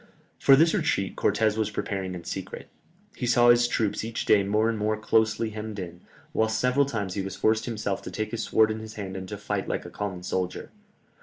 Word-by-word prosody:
For 135 - +7
this 160 +3 +4
retreat 95 -1 0
Cortès 110 +1 +1
was 110 -1 0
preparing 95 -3 -3
in 85 - -7
secret. 95 +2 -6 0.5
He 125 - -3
saw 120 0 +5
his 120 0 +6
troops 110 -4 -1
each 115 0 -4
day 105 - +5
more 105 +3 +1
and 115 - 0
more 105 +1 0
closely 110 +1 +1
hemmed 110 0 -6
in, 90 -2 -7 0.3
whilst 110 0 +1
several 125 +3 +2
times 105 -8 -3
he 100 - -2
was 95 0 -5
forced 110 +2 +1
himself 110 -4 -2
to - - -7
take 110 -1 -4
his 115 - -3
sword 110 0 +3
in 110 - -4
his 110 0 -9
hand 95 -2 -6
and 95 -1 -6
to - - -5
fight - - -3
like - - -3
a - - -9
common 95 -4 -5
soldier. 90 0 -3
110 Hz, 220 wpm, -26 LUFS, 95-110 Hz, 0.5 s, For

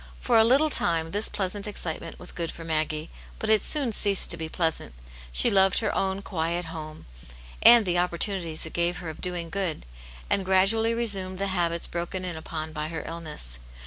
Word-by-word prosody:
For 225 - +3
a - - +7
little 275 +7 +3
time 165 -6 +2
this 205 +3 +1
pleasant 200 +1 -1
excitement 175 -6 -4
was 180 - 0
|;ood 165 -1 -2
for 165 - -10
Maggie, 155 0 -2 0.3
but 220 - -1
it 215 - +5
soon 280 -6 +2
ceased 200 -2 +3
to - - -1
be 160 -1 -5
pleasant. 160 - -2 0.4
She - - +2
loved 195 -1 +4
her 220 - +1
own 195 +1 -1
quiet 170 -1 -2
home, 155 -1 -8 0.6
and 235 -2 +8
the 175 -1 +1
opportunities 175 -2 -1
it 160 - -9
gave 170 +1 0
her 170 -3 -6
of 155 - -13
doing 175 -2 -2
good, 190 -6 -3 0.4
and 195 - +1
gra 190 0 +4
dually 225 +3 +2
resumed 195 -5 +1
the 200 +1 -1
habits 170 -2 +1
broken 175 +2 -4
in 175 -2 -4
upon 160 0 -6
by 155 0 -3
her 160 0 -5
illness. 150 - -6
175 Hz, 195 wpm, -26 LUFS, 160-200 Hz, 0.6 s, and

